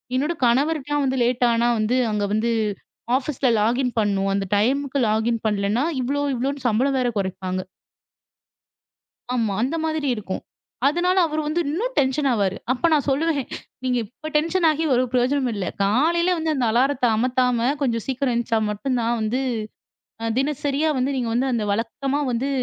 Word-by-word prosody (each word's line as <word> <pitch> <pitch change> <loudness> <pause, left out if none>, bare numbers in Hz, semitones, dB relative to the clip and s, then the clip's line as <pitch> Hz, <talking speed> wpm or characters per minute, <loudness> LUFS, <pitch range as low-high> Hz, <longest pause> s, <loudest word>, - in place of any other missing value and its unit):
என்னோட 295 +6 +1
கணவருக்கலாம் 290 +3 +1
வந்து 265 0 0
லேட் 245 +1 +2
ஆனா 230 +1 +2
வந்து 215 +3 +1 0.2
அங்கே 210 -1 0
வந்து 225 +2 +1 0.7
ஆஃபீஸ்ல 270 -1 -1
லாகின் 245 +4 +1
பண்ணணும், 195 -2 +1
அந்த 195 0 -1
டைமுக்கு 275 +5 +1
லாகின் 220 +2 0
பண்ணலன்னா 210 +4 0 0.2
இவ்வளோ 285 +3 -1
இவ்வளோன்னு 270 +2 -3
சம்பளம் 260 +5 +2
வேற 245 - +1
குறைப்பாங்க. 185 -1 -2 1.8
ஆமா 225 -4 0
அந்த 275 +6 0
மாதிரி 315 -2 -1
இருக்கும். 200 -4 -5 0.5
அதனால 350 +5 +1
அவர் 310 0 -2
வந்து 310 +3 0
இன்னும் 465 +11 -2
டென்ஷன் 275 +1 +2
ஆவாரு. 200 -4 0 0.2
அப்ப 255 +5 +1
நான் 295 -3 +2
சொல்லுவேன் 285 -1 0 0.4
"நீங்க 250 -1 +1
இப்ப 310 +9 -9
டென்ஷன் 335 +3 +2
ஆகி 310 +1 -1
ஒரு 250 - +3
பிரயோஜனமும் 255 0 +1
இல்ல. 195 - -2 0.2
காலையில 330 - +2
வந்து 320 -1 0
அந்த 255 -4 0
அலாரத்த 255 +3 +2
அமத்தாம 250 0 +1
கொஞ்சம் 230 -5 0
சீக்கிரம் 265 -1 -1
எந்திச்சா 235 -1 0
மட்டும் 250 +5 -2
தான் 230 +1 +1
வந்து, 220 +4 0 1.0
தினசரியா 290 +2 0
வந்து 265 +2 0
நீங்க 240 -3 -1
வந்து 260 +3 +1
அந்த 230 -3 0
வழக்கமா 270 +6 -2
வந்து 245 +3 -1
255 Hz, 155 wpm, -23 LUFS, 230-285 Hz, 1.8 s, ஒரு